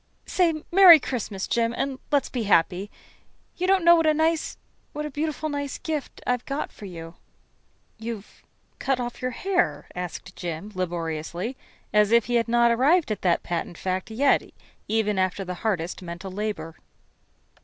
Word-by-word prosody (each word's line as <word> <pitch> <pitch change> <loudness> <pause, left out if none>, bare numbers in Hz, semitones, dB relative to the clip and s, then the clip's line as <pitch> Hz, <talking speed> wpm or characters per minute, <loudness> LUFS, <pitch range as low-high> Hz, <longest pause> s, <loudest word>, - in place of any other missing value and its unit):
Say 330 -4 +1
'Merry 355 -3 +10
Christmas,' 215 -7 -3
Jim, 230 0 0
and 270 -1 -2
let's 285 -2 +2
be 240 -4 -2
happy. 185 +1 +2 0.7
You 365 - -1
don't 380 -2 +3
know 340 - +9
what 330 -1 +2
a 310 - +4
nice 320 +1 0 0.4
what 300 0 -4
a 300 - -5
beautiful, 310 +2 -2
nice 285 -2 -3
gift 305 -4 -5
I've 250 -1 0
got 280 +2 -3
for 210 - -11
you." 165 -3 -8 0.9
"You've 225 -2 -7 0.4
cut 270 -2 0
off 240 -1 -5
your 255 - 0
hair?" 255 - 0
asked 180 +1 -6
Jim 175 +4 -5
laboriously, 175 - -3 0.4
as 210 0 +4
if 235 -1 +5
he 245 - -3
had 235 -1 +2
not 235 0 +4
arrived 280 +5 +3
at 215 - -3
that 175 -2 +2
patent 175 0 -3
fact 185 +2 -2
yet, 270 +6 +3 0.5
even 210 -2 +1
after 185 +1 0
the 180 - -4
hardest 185 -6 -1
mental 175 +2 -7
labor. 205 -4 -4
230 Hz, 165 wpm, -25 LUFS, 185-285 Hz, 0.9 s, Merry